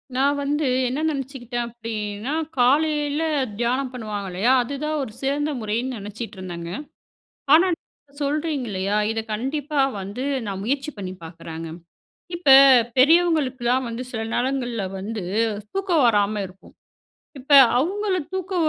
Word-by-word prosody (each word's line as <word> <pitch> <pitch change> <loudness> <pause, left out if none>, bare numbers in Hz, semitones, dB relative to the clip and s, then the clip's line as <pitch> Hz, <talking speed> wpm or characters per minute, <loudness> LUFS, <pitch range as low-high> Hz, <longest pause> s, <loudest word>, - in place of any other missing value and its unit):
நான் 280 +2 +2
வந்து 295 +1 0 0.2
என்ன 255 +4 -2
நினச்சிக்கிட்டேன் 255 -4 -4
அப்பிடின்னா, 225 +1 -5 0.2
காலையில 295 +3 +2 0.4
தியானம் 250 +2 0
பண்ணுவாங்க 210 -5 -5
இல்லயா, 205 +8 +2
அதுதான் 300 +5 -3
ஒரு 240 - -7
சிறந்த 290 +2 0
முறைன்னு 235 +4 -2
நினச்சிட்டு 210 +2 -7
இருந்தேங்க. 170 -2 -6 0.8
ஆனா, 335 +4 +6 0.5
சொல்றீங்க 295 -1 -1
இல்லயா! 200 +1 -1
இத 225 - -2
கண்டிப்பா 285 +5 -1 0.2
வந்து 200 +6 -5 0.2
நான் 195 -2 -4
முயற்சி 275 +5 -1
பண்ணி 185 -2 -5
பார்க்குறேங்க. 165 0 -8 0.7
இப்ப 345 -4 0 0.5
பெரியவங்களுக்குலாம் 265 -5 +3
வந்து 235 +2 -5
சில 225 - -3
நேரங்கள்ல 245 -4 -1 0.2
வந்து 210 +1 -5 0.5
தூக்கம் 375 -6 +1
வராம 210 -2 +2
இருக்கும். 185 +1 -18 0.7
இப்ப 270 +3 -4 0.3
அவுங்கள 385 +7 0 0.2
தூக்க 375 0 -3
255 Hz, 120 wpm, -23 LUFS, 210-290 Hz, 0.8 s, ஆனா